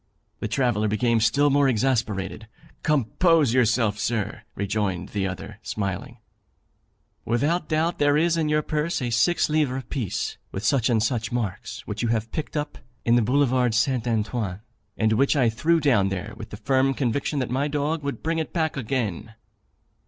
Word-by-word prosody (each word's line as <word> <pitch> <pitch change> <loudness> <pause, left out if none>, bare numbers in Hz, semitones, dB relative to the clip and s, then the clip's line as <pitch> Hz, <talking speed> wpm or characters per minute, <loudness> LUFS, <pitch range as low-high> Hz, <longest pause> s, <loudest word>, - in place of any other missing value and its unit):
The - - -2
traveller 120 -5 +1
became 115 +2 +2
still 145 +6 +3
more 140 0 +4
exasperated. 110 -4 -1 0.3
'Compose 150 - +3
yourself, 115 -4 +2
sir,' 115 -4 -2
rejoined 100 -2 -2
the 100 -2 -1
other, 95 -2 -7
smiling; 100 -3 -4 1.1
'without 150 +9 0
doubt 160 +2 0
there 145 0 +4
is 170 +2 +3
in 160 -2 0
your 150 0 +2
purse 155 +3 -1
a 125 -3 -2
six 165 +10 +3
livre 145 -4 0
piece, 115 -4 -3
with 95 - -5
such 130 -4 +2
and 110 -3 +2
such 115 -2 -1
marks, 115 -6 -4
which - - -4
you 120 - 0
have 115 0 -1
picked 155 0 -4
up 150 0 -4 0.3
in 115 - +4
the 120 - +5
Boulevard 125 -1 +2
St. 125 0 +1
Antoine, 110 -4 -1 0.4
and 110 0 +2
which 135 +6 +3
I 125 -5 +3
threw 165 +9 +2
down 120 -10 +3
there 95 +3 -4
with 110 - -9
the 105 - -8
firm 135 +4 +2
conviction 140 +3 -1
that 130 -3 -1
my 135 +3 +1
dog 150 +2 -1
would 140 -1 -4
bring 165 0 0
it 160 - -3
back 160 -3 -1
again. 115 -5 -3
125 Hz, 170 wpm, -24 LUFS, 110-145 Hz, 1.1 s, the